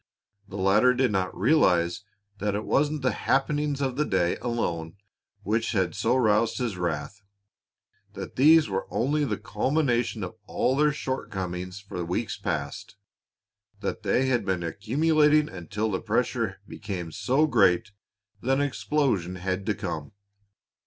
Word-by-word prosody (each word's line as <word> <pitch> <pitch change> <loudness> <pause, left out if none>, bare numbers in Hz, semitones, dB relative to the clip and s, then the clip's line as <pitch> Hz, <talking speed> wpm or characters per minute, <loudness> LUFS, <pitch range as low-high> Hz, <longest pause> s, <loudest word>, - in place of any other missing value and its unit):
The 100 - -8
latter 105 +7 +4
did 130 -2 +2
not 95 -2 -1
realize 95 - +3 0.4
that 105 0 -1
it 105 - -3
wasn't 145 0 +1
the 130 - +3
happenings 145 +4 0
of 130 -2 -1
that 150 - 0
day 90 -2 +2
alone 85 -9 -3 0.5
which 110 +3 0
had 95 -5 +1
so 120 +8 +1
roused 110 -2 +2
his 120 -6 -2
wrath, 85 +2 -3 0.9
that - - -7
these 155 +3 +6
were 95 -1 -3
only 145 +5 +1
the - - -2
culmination 125 -7 0
of 90 - -5
all 130 - +1
their 150 +1 +3
shortcomings 95 -10 -4
for 95 -3 -6
weeks 90 +7 -2
past, 75 -2 -4 0.9
that - - -3
they 130 - +1
had 125 -4 +1
been 95 -3 -1
accumulating 150 - +2
until 105 - -3
the 95 - -2
pressure - - -1
became 90 -4 -6
so 135 - +2
great 105 - +3 0.5
that 130 +2 +1
an - - +1
explosion 130 - 0
had 95 +2 -3
to 105 - +1
come. 85 -7 -5
105 Hz, 145 wpm, -26 LUFS, 95-135 Hz, 0.9 s, these